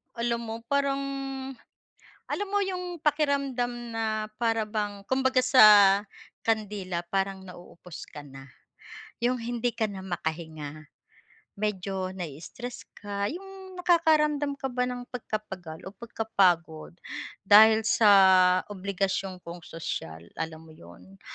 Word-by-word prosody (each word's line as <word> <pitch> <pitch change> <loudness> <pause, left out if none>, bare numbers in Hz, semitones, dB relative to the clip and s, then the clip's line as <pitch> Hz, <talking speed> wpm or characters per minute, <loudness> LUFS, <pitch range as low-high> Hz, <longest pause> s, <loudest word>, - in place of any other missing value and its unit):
Alam 235 0 -1
mo 225 0 -5
parang, 280 0 +1 1.2
alam 410 - -3
mo 405 +1 +1
yung 360 -3 -5
pakiramdam 275 -5 0
na 215 -1 -2
para 225 -1 +1
bang 210 -2 -4
kumbaga 260 +2 +2
sa 260 - +7 0.8
kandila 205 -5 -2
parang 195 +2 -2
nauubos 180 -2 -11
ka 145 - -10
na, 135 -1 -12 0.7
'yung 245 +2 +1
hindi 240 0 -2
ka 225 - +1
na 200 -3 -4
makahinga 160 -4 -5 0.7
medyo 195 -2 -3
na-istress 180 - -7 0.2
ka, 200 -1 -3
yung 380 +2 -9
nakakaramdam 300 -5 +2
ka 270 - -6
ba 250 0 0
ng 245 0 -5
pagkapagal 190 -9 -6
o 190 - -8
pagkapagod 185 -8 0 0.5
dahil 220 +2 +7
sa 220 -1 +4 0.6
obligasyon 195 -1 -2
kong 170 +1 -8
sosyal 85 - -6
alam 160 0 -6
mo 160 - -14
'yun, 90 - -16
215 Hz, 115 wpm, -27 LUFS, 180-250 Hz, 1.2 s, sa